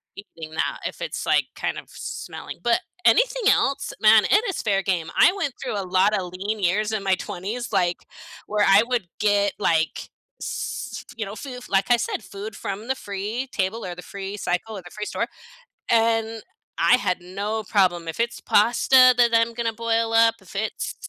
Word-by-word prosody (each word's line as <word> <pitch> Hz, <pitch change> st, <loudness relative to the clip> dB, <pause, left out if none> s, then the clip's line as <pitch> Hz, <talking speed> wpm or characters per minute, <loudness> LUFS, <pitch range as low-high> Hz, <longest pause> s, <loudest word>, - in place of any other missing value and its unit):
eating 165 Hz, -6 st, -10 dB
that 160 Hz, -, -2 dB
if -, -, -5 dB
it's, -, -, -4 dB
like, -, -, +3 dB
kind -, -, -3 dB
of -, -, -8 dB
smelling, -, -, -7 dB
but 240 Hz, -1 st, +3 dB, 0.3 s
anything -, -, +4 dB
else? 275 Hz, 0 st, 0 dB
Man, 215 Hz, 0 st, +7 dB
it 420 Hz, +3 st, +4 dB
is 385 Hz, -, -3 dB
fair 195 Hz, -2 st, +1 dB
game, 175 Hz, -4 st, -1 dB
I -, -, +7 dB
went 330 Hz, -9 st, -2 dB
through 205 Hz, -, -2 dB
a -, -, -3 dB
lotta 190 Hz, +2 st, +2 dB
lean 195 Hz, +5 st, -4 dB
years 205 Hz, +3 st, +1 dB
in 215 Hz, -2 st, -2 dB
my 190 Hz, -1 st, +3 dB
20s, 210 Hz, +7 st, -5 dB
like, 175 Hz, -1 st, +1 dB, 0.5 s
where 210 Hz, 0 st, +2 dB
I 195 Hz, +2 st, +7 dB
would 240 Hz, -6 st, -1 dB
get, 205 Hz, -1 st, +2 dB
like, 165 Hz, -5 st, 0 dB, 0.3 s
s -, -, -5 dB
you 220 Hz, -, -2 dB
know, 200 Hz, +2 st, -7 dB
foo 255 Hz, 0 st, -7 dB
like 195 Hz, +4 st, +1 dB
I 240 Hz, -, +6 dB
said, 230 Hz, -, -3 dB
food 200 Hz, +2 st, -8 dB
from 200 Hz, +3 st, -5 dB
the 265 Hz, -, 0 dB
free 210 Hz, +4 st, -4 dB
table, 205 Hz, +3 st, -2 dB
or 180 Hz, -1 st, -5 dB
the 180 Hz, -, -9 dB
free 200 Hz, +1 st, -6 dB
cycle, 200 Hz, +3 st, -2 dB
or -, -, -7 dB
the 175 Hz, -, -12 dB
free 210 Hz, 0 st, -5 dB
store. -, -, -2 dB, 0.6 s
And, 225 Hz, -1 st, +2 dB, 0.4 s
I -, -, +6 dB
had 185 Hz, -8 st, -1 dB
no 200 Hz, +5 st, -3 dB
problem, 175 Hz, -4 st, +2 dB
if 165 Hz, +7 st, -2 dB
it's 235 Hz, 0 st, -2 dB
pasta 255 Hz, +4 st, +5 dB
that 240 Hz, -1 st, +5 dB
I'm 230 Hz, 0 st, +3 dB
gonna 230 Hz, -1 st, -2 dB
boil 230 Hz, 0 st, 0 dB
up, 225 Hz, 0 st, +5 dB
if 190 Hz, +1 st, -15 dB
it's 215 Hz, +2 st, -3 dB
210 Hz, 190 wpm, -23 LUFS, 195-230 Hz, 0.6 s, Man